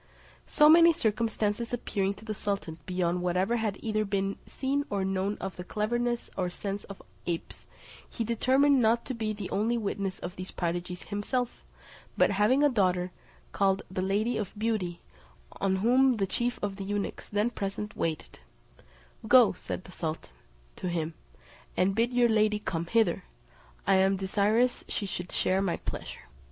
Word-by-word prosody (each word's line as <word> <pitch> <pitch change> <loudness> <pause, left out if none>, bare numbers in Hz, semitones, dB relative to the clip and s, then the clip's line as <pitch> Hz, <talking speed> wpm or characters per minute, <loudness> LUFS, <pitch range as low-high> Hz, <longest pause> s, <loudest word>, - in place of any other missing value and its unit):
So 300 - +5
many 335 +2 +8
circumstances 220 -1 0
appearing 200 -4 -1
to 210 - -14
the 215 - -3
sultan 195 -6 -3
beyond 180 -1 0
whatever 180 +6 +1
had 215 -3 -1
either 215 -1 0
been 195 -1 -1
seen 280 +2 -1
or 195 -2 -1
known 195 +2 -1
of 190 0 -6
the 180 - -5
cleverness 240 +5 -1
or 180 -2 -1
sense 200 +3 -4
of 195 - -10 0.2
apes, 170 -1 -4 0.4
he 230 - -3
determined 260 +4 +3
not 230 +1 +3
to 260 - -3
be 220 -2 -2
the 205 -3 -6
only 225 +4 +1
witness 200 -3 -2
of 175 +1 -7
these 185 +1 -6
prodigies 175 +1 -3
himself, 235 +4 -2 0.5
but - - +4
having 210 +8 +3
a - - +7
daughter, 185 -6 +1 0.4
called 195 0 +2
the 185 - -2
Lady 205 +5 +1
of 205 0 -5
Beauty, 205 -6 -1 0.6
on 195 -1 +2
whom 250 +5 +4
the 195 - +1
chief 240 +5 -1
of 200 -1 -2
the 200 - -5
eunuchs, 205 +1 -3
then 210 +3 +1
present, 210 0 -4
waited; 160 - -3 0.9
"Go," 245 -2 +7
said 180 - -6
the 185 - -13
sultan 160 - -5 0.4
to 180 - -3
him, 165 -2 -2 0.6
"and 190 +2 +3
bid 230 +4 +1
your 245 -1 +4
lady 215 -1 +3
come 170 -5 -3
hither: 225 - +2 0.6
I 195 - +4
am 190 +1 +3
desirous 210 +6 +2
she 205 - -2
should 180 -2 -5
share 190 +1 +1
my 190 -3 0
pleasure." - - -6
205 Hz, 165 wpm, -29 LUFS, 190-230 Hz, 0.9 s, many